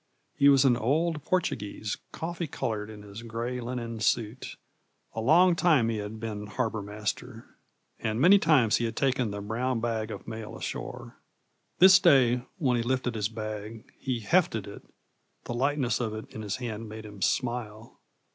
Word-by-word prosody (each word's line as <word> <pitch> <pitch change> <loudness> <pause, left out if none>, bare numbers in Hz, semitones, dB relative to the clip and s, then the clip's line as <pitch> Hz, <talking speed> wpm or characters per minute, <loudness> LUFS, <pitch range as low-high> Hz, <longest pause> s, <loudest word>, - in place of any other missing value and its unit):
He 140 - +5
was 140 -1 +5
an 125 -2 +5
old 150 +6 0
Portuguese, 105 - -2
coffee 170 0 -4
colored 110 -5 -3
in 105 -1 -10
his 105 +2 -9
gray 120 +2 -4
linen 120 -2 -4
suit. 110 +3 -1 0.6
A 110 - -3
long 170 +8 +5
time 155 -10 +3
he 115 - -1
had 105 +1 -6
been 105 -2 -5
harbor 110 -1 -2
master, 105 +3 -5 0.5
and 110 0 -2
many 185 +8 +7
times 140 - +4
he 120 - -1
had 115 0 -3
taken 130 -4 +1
the 100 0 -5
brown 120 +4 -1
bag 110 -1 -2
of - - -8
mail 110 -1 -7
ashore. - - -6 0.6
This 190 +1 +8
day, 130 -9 +5 0.2
when 125 -5 +1
he - - +1
lifted 125 0 -1
his 105 -2 -1
bag, 110 0 -7
he 125 -3 -2
'hefted' 115 - +2
it: 100 - -10 0.6
the - - -5
lightness 135 0 0
of 110 -3 -2
it 110 - -9
in 110 - -6
his 105 -1 -3
hand 115 -3 -5
made 110 0 -8
him 105 -2 -11
smile. 120 -1 -2
115 Hz, 170 wpm, -28 LUFS, 110-130 Hz, 0.6 s, This